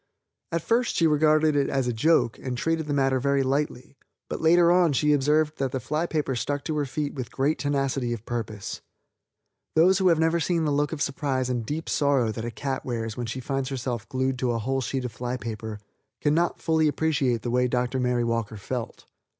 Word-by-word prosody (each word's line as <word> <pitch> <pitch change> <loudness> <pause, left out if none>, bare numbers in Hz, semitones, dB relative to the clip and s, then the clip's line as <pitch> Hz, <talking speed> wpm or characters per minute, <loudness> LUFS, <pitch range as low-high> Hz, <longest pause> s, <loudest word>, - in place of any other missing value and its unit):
At 165 -1 -1
first 240 +1 +1
she 165 - +3
regarded 155 0 +4
it 140 -1 +2
as 135 -2 0
a 120 - 0
joke 120 -1 +2
and 125 -2 -4
treated 165 +3 -1
the - - -2
matter 135 -1 +2
very 140 +1 +2
lightly, 135 -1 -2 0.3
but - - -4
later 170 +1 +5
on 175 -4 +4
she 150 +2 +3
observed 150 +2 +2
that 135 -2 0
the 130 - -2
fly 155 +6 -1
paper 150 -5 -1
stuck 145 +4 -2
to 155 -2 -2
her 145 -2 0
feet 145 +2 -3
with 130 -4 -6
great 140 +4 0
tenacity 135 -3 0
of 115 -2 -5
purpose. 110 -4 -5 0.9
Those 180 +4 +5
who 190 - +3
have 170 -2 +5
never 160 +1 +2
seen 165 0 0
the 150 - +1
look 145 +1 +1
of 150 -4 -1
surprise 135 -2 -1
and 120 -2 -1
deep 150 +8 -4
sorrow 140 -6 +2
that 110 +1 -5
a 120 - -3
cat 130 +4 -4
wears 115 -3 -3
when 120 -2 -4
she 120 +3 -4
finds 135 +1 -2
herself 125 -4 -4
glued 130 0 -1
to 125 -2 +1
a - - 0
whole 135 +4 -1
sheet 130 +1 -2
of 125 - -4
fly 125 +2 -4
paper 110 -2 -6 0.4
can 145 0 +2
not 170 +2 +1
fully 160 -1 +2
appreciate 140 -6 0
the 120 - -2
way 125 +1 +2
Dr. 125 +1 -1
Mary 125 -1 +1
Walker 115 -2 -2
felt. 115 +3 -5
135 Hz, 215 wpm, -26 LUFS, 125-155 Hz, 0.9 s, later